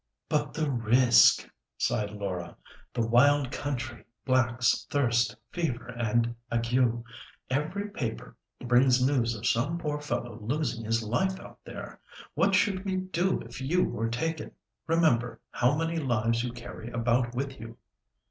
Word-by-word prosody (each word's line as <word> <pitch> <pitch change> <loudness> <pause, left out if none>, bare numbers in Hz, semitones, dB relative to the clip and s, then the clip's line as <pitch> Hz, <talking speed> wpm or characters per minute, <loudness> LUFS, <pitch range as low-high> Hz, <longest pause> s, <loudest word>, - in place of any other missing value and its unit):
"But 150 -3 0
the 155 -1 0
risk!" 120 -1 +5 0.3
sighed 105 -1 0
Laura; 100 -4 -5 0.3
"the 115 - 0
wild 130 +3 +4
country, 130 -4 -4 0.2
blacks, 120 -3 +2
thirst, 120 -6 +2 0.2
fever 130 -9 -2
and 120 -1 0 0.2
ague. 120 0 +1 0.5
Every 160 +9 -1
paper 115 - -5 0.3
brings 125 +1 +4
news 120 -4 +1
of 110 +1 -7
some 145 +11 +1
poor 150 -3 -2
fellow 120 -5 -4
losing 120 0 -2
his 115 +1 0
life 190 - 0
out - - -12
there. - - -8 0.3
What 195 -1 +3
should 195 -1 +2
we 190 -2 -1
do 185 0 0
if 120 +3 -9
you 170 +7 +2
were 115 0 -1
taken? 160 +7 -3 0.3
Remember 155 -8 +2
how 125 +4 +2
many 165 +1 -1
lives 115 -5 +1
you 125 - -2
carry 120 -1 -8
about 120 +1 0
with 135 0 -3
you." 115 +1 -9
125 Hz, 140 wpm, -28 LUFS, 115-150 Hz, 0.5 s, risk